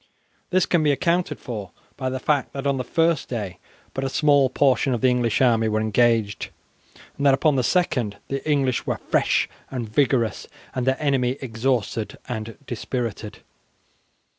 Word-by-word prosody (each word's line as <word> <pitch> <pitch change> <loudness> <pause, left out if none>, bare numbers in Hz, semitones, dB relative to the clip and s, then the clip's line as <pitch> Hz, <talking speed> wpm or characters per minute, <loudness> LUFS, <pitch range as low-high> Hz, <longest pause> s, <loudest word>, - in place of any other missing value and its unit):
This 185 -1 +3
can 175 - +2
be 150 -1 +3
accounted 170 +5 0
for 105 -6 -6 0.3
by 130 -1 -2
the 130 0 -3
fact 145 0 0
that 135 0 -5
on 140 -1 +1
the 130 - -2
first 165 +3 +1
day 105 -7 -4 0.3
but 135 - -3
a 135 - -1
small 140 -1 +4
portion 130 0 +2
of 115 - -4
the 130 - +5
English 120 -2 +1
army 115 -3 +3
were 110 0 +1
engaged, 110 -1 +1 0.7
and 140 - -2
that 135 - +6
upon 150 +1 +2
the 130 - +2
second 125 - +1
the 135 0 -3
English 135 -4 +1
were - - 0
fresh - - +1 0.2
and 125 -4 -4
vigorous, 120 -1 +1 0.3
and 130 0 -2
their 130 0 +2
enemy 135 -3 +1
exhausted 115 -3 -2
and 110 -2 -5
dispirited. 115 -3 -4
130 Hz, 165 wpm, -23 LUFS, 115-140 Hz, 0.7 s, that